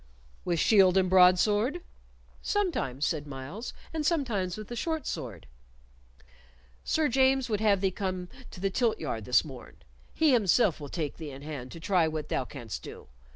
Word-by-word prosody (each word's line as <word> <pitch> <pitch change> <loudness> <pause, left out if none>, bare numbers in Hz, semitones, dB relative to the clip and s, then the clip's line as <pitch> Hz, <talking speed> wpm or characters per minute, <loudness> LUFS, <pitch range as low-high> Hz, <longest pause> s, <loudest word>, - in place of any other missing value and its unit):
"With 170 -2 0
shield 190 -2 +5
and 190 -1 +3
broadsword?" 205 - +4 0.6
"Sometimes," 150 - -1
said 150 -2 -2
Myles, 145 - -7 0.2
"and 315 -1 -2
sometimes 235 - 0
with 215 -1 -7
the 240 - -6
short 320 +3 -2
sword." - - -5 1.4
"Sir 315 -1 +1
James 265 0 +2
would 210 - +1
have 205 -3 +3
thee 195 -1 +1
come 185 -2 -3 0.2
to - - -11
the 195 +1 -1
tilt 235 +1 +1
yard 115 -8 -4
this 125 +5 +3
morn; 130 -5 -11 0.4
he 315 -2 +4
himself 210 -5 +3
will 145 -2 -8
take 155 -4 -4
thee 160 -3 -7
in 140 0 -10
hand 140 -5 -7
to 165 - -9
try 175 -1 +2
what 155 -1 -4
thou 130 - -1
canst 120 -6 -7
do. - - -11
185 Hz, 170 wpm, -29 LUFS, 150-240 Hz, 1.4 s, shield